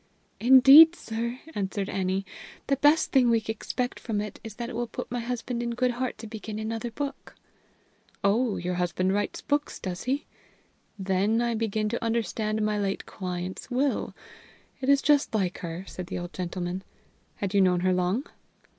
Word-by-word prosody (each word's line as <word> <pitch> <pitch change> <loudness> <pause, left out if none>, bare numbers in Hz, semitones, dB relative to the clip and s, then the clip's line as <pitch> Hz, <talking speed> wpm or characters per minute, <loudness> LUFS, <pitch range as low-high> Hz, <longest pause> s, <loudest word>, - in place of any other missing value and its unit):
"Indeed, 270 +7 +9
sir," 235 0 -4
answered 195 0 -2
Annie, 190 0 -1 0.4
"the 275 - +1
best 295 +4 +4
thing 255 -3 +4
we 230 - +4
expect 245 +3 -3
from 220 -3 -2
it 210 0 -5
is 220 -2 -8
that 235 +1 -4
it 245 - -7
will 240 +1 -2
put - - -7
my 245 - -1
husband 240 0 -3
in 235 0 -2
good 250 0 +2
heart 250 +1 -3
to - - -9
begin 215 -1 -6
another 225 +2 -3
book." 280 +4 -6 0.9
"Oh! 215 +2 +2
your 180 +1 -2
husband 180 +1 0
writes 205 +1 -2
books, 290 0 -1
does 180 -2 -5
he? 270 +3 -1 0.7
Then 195 +3 +1
I 235 0 +1
begin 220 -1 -1
to 235 - -3
understand 220 -1 -1
my 210 0 0
late 195 -1 -2
client's 180 +1 -5
will. 265 +3 0 0.6
It 265 0 -2
is 280 -1 +5
just 290 -5 +3
like 190 -4 0
her," 170 +2 -6
said 180 -2 -7
the - - -4
old 175 0 -6
gentleman. 180 +1 -4 0.5
"Had 200 -1 -3
you 200 - +5
known 180 -2 +3
her 185 0 +2
long?" 180 - 0
220 Hz, 175 wpm, -27 LUFS, 190-245 Hz, 0.9 s, Indeed